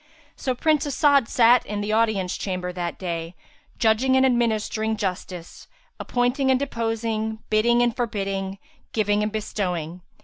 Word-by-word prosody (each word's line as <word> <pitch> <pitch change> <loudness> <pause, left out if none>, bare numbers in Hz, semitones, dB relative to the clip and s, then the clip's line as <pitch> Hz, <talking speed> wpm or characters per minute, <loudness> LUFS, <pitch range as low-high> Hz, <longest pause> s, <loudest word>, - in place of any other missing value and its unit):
So 255 -2 -2
Prince 300 +2 +1
As'ad 280 -3 +3
sat 240 +1 +5
in 205 0 -4
the 210 +1 -2
audience 215 -5 +1
chamber 180 -2 -3
that 175 -1 -4
day, 170 -1 -4 0.4
judging 240 +4 +3
and 260 - +5
administering 220 -3 0
justice, 180 -3 -5 0.3
appointing 245 +2 0
and 260 -1 +4
deposing, 225 -4 -2
bidding 235 +3 +4
and 240 -1 +1
forbidding, 195 -5 -2 0.4
giving 210 -1 +1
and 210 0 -1
bestowing. 180 -6 -3
220 Hz, 135 wpm, -24 LUFS, 195-240 Hz, 0.4 s, sat